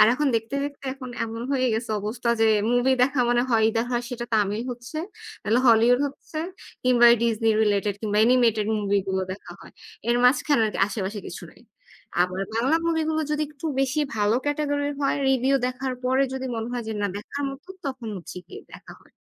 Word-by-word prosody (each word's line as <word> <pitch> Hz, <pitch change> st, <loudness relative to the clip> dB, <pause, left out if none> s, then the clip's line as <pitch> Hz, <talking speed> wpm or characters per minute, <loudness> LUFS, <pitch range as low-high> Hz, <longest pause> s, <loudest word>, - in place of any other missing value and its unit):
আর 215 Hz, -, +9 dB
এখন 295 Hz, +2 st, 0 dB
দেখতে 225 Hz, +4 st, -4 dB
দেখতে 285 Hz, -1 st, -7 dB
এখন 255 Hz, -2 st, -8 dB
এমন 230 Hz, +1 st, -6 dB
হয়ে 255 Hz, -1 st, +2 dB
গেছে 225 Hz, 0 st, -3 dB
অবস্থা 230 Hz, +3 st, -3 dB
যে 225 Hz, -, +5 dB, 0.2 s
movie 245 Hz, +2 st, +3 dB
দেখা 270 Hz, 0 st, +2 dB
মানে 240 Hz, 0 st, +3 dB
হয় 225 Hz, -2 st, +3 dB
ইদার 225 Hz, +1 st, 0 dB
হয় 240 Hz, 0 st, 0 dB
সেটা 245 Hz, -2 st, -5 dB
তামিল 210 Hz, +1 st, +1 dB
হচ্ছে, 240 Hz, +5 st, -7 dB, 0.5 s
না 240 Hz, -, +5 dB
Hollywood 235 Hz, +3 st, +5 dB
হচ্ছে, 285 Hz, +3 st, -8 dB, 0.4 s
কিংবা 245 Hz, -1 st, +4 dB
এই -, -, +4 dB
Disney 225 Hz, -1 st, +2 dB
related 205 Hz, -1 st, +1 dB
কিংবা 210 Hz, -1 st, 0 dB
animated 230 Hz, -4 st, +3 dB
movie 205 Hz, -1 st, +1 dB
গুলো 190 Hz, 0 st, 0 dB
দেখা 195 Hz, -, -11 dB
হয়। -, -, -14 dB, 0.4 s
এর 240 Hz, -, +3 dB
মাঝখানে 280 Hz, +1 st, +4 dB
আরকি 210 Hz, -, -4 dB
আশেপাশে 205 Hz, 0 st, -4 dB
কিছু -, -, -8 dB
নাই। -, -, -21 dB, 0.6 s
আবার 185 Hz, +1 st, -2 dB
বাংলা 265 Hz, +8 st, +2 dB
movie 320 Hz, -1 st, +1 dB
গুলো 315 Hz, 0 st, 0 dB
যদি 300 Hz, 0 st, 0 dB
একটু 300 Hz, +2 st, -8 dB
বেশি 270 Hz, +3 st, +1 dB, 0.2 s
ভালো 210 Hz, +1 st, +2 dB
category 290 Hz, -1 st, 0 dB
হয়, 275 Hz, 0 st, +1 dB
review 265 Hz, +1 st, +3 dB
দেখার 255 Hz, +1 st, -3 dB
পরে 260 Hz, +2 st, +3 dB
যদি 265 Hz, 0 st, -4 dB
মনে 225 Hz, +1 st, -3 dB
হয় 245 Hz, -1 st, -2 dB
যে -, -, -2 dB
না -, -, +2 dB
দেখার 280 Hz, +7 st, -6 dB
মতো 275 Hz, +7 st, -11 dB, 0.2 s
তখন 260 Hz, -4 st, -5 dB
হচ্ছে 175 Hz, -, -9 dB
গিয়ে -, -, -10 dB
দেখা -, -, -12 dB
হয়। -, -, -25 dB
245 Hz, 195 wpm, -24 LUFS, 220-270 Hz, 0.6 s, আর